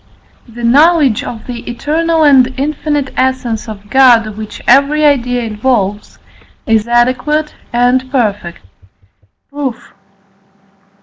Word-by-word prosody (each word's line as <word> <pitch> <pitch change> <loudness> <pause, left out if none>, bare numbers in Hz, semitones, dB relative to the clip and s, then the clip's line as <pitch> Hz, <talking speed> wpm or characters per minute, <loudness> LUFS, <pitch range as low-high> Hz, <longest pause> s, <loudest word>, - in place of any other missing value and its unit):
The 235 +1 -10
knowledge 285 0 +3
of 225 -2 -8
the 245 -2 -6
eternal 320 +6 0
and 265 -3 +4
infinite 290 -1 -2
essence 255 -4 -2
of 205 -1 -11
God 235 -5 +4
which 215 0 -8
every 280 +4 +3
idea 245 -4 +1
involves 215 -2 -2 0.5
is 225 0 +1
adequate 255 +6 0 0.2
and 245 +2 +1
perfect. 205 - -3 0.9
Proof. 265 -5 -6
250 Hz, 105 wpm, -13 LUFS, 225-285 Hz, 0.9 s, and